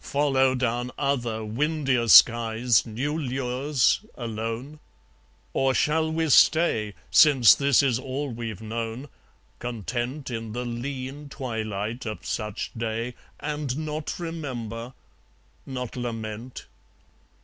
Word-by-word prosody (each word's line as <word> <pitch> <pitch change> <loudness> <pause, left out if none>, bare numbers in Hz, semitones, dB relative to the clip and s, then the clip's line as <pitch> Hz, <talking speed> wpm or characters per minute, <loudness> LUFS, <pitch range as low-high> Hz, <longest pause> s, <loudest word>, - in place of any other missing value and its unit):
Follow 135 -2 +2
down 120 -1 -1
other 120 -6 -1
windier 135 +1 0
skies 115 -2 +6
New 130 +7 -2
lures, 130 - 0
alone? 115 +5 -5 0.7
Or 135 -1 +2
shall 160 +1 +2
we 160 0 0
stay, 120 -9 +4 0.2
Since 135 -8 +7
this 140 -1 +3
is 125 -3 +2
all 135 +2 -4
we've 115 -2 -6
known, 115 +4 -4 0.5
content 120 +4 -4
In 115 -2 -5
the 125 +1 -3
lean 130 +4 -5
twilight 110 -3 -4
of 110 - -6
such 105 -1 -3
day, 115 +1 -3 0.3
And 150 -3 -3
not 155 0 -4
remember, 130 -8 -5 0.7
not 125 -3 -5
lament? 115 0 -5
125 Hz, 105 wpm, -26 LUFS, 115-140 Hz, 0.7 s, Since